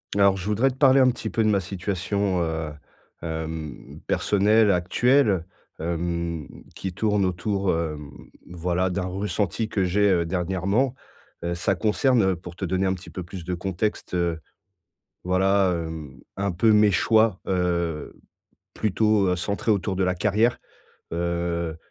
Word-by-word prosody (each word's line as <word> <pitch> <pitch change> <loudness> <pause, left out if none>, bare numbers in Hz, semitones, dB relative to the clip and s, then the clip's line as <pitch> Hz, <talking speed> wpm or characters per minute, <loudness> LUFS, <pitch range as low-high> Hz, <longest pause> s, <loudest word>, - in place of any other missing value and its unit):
Alors, 100 -1 +5
je 95 0 -6
voudrais 110 +6 +2
te 125 - -7
parler 135 0 +5
un 130 -1 +6
petit 120 - -4
peu 115 - 0
de 110 - +3
ma 100 -2 +3
situation, 95 0 -1
heu, 80 -1 -3 0.5
hem, 80 -3 -6
personnelle 105 +2 +3
actuelle, 95 +2 +2 0.3
hem, 85 -1 -2 0.3
qui 95 - -4
tourne 105 +1 +1
autour, 95 +2 0
hem, 75 -3 -3 0.4
voilà, 90 +1 -1
d'un 90 0 -2
ressenti 100 +2 -2
que 95 -3 0
j'ai, 100 +3 +3
heu, 85 -3 +2
dernièrement. 95 +8 0 0.5
Heu, 85 0 -1
ça 95 +3 0
concerne, 115 +4 +2
heu, 95 -1 +2
pour 85 0 -11
te 95 - -3
donner 95 +2 0
un 95 - +2
petit 90 -2 -9
peu 90 - -6
plus 85 0 -9
de 90 - -2
contexte, 95 +4 -3
heu, 85 -2 0 0.8
voilà, 95 +1 +3
hem, 80 -5 -6 0.2
un 100 -1 0
peu 110 +6 +3
mes 105 -1 +5
choix, 110 -1 +3
heu, 85 -4 -1 0.6
plutôt, 105 -1 +2
heu, 90 - +2
centrés 100 +4 0
autour 95 -1 -1
de 95 - +1
la 90 - +1
carrière. 105 +6 +2 0.5
Heu, 85 -1 -2
95 Hz, 155 wpm, -24 LUFS, 85-105 Hz, 0.8 s, un